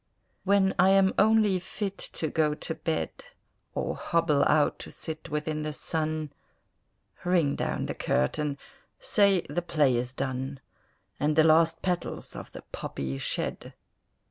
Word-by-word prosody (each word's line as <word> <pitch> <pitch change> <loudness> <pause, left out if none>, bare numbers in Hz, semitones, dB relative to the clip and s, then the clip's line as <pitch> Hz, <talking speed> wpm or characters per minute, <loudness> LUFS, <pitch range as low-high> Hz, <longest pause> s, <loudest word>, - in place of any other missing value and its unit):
When 195 -1 +4
I 185 +2 +6
am 195 0 +5
only 215 -2 +4
fit 195 +2 -4 0.2
to 160 - -2
go 150 -1 +1
to 160 - -4
bed, 160 -1 -2 0.6
Or - - -1
hobble 165 -4 +2
out 150 -1 +3
to - - -7
sit 160 0 -7
within 150 0 -2
the 155 0 -2
sun, 155 -1 -2 0.9
Ring 175 -6 +2
down - - -2
the - - -3
curtain, 140 - 0 0.4
say 200 - +3
the 175 - -2
play 150 -7 +2
is 120 +1 -1
done, 130 +1 -3 0.6
And 150 +1 +1
the 160 - +6
last 165 +1 +4
petals 180 -2 -2
of - - -8
the - - -10
poppy 70 0 -4
shed! - - -3
160 Hz, 145 wpm, -28 LUFS, 150-180 Hz, 0.9 s, I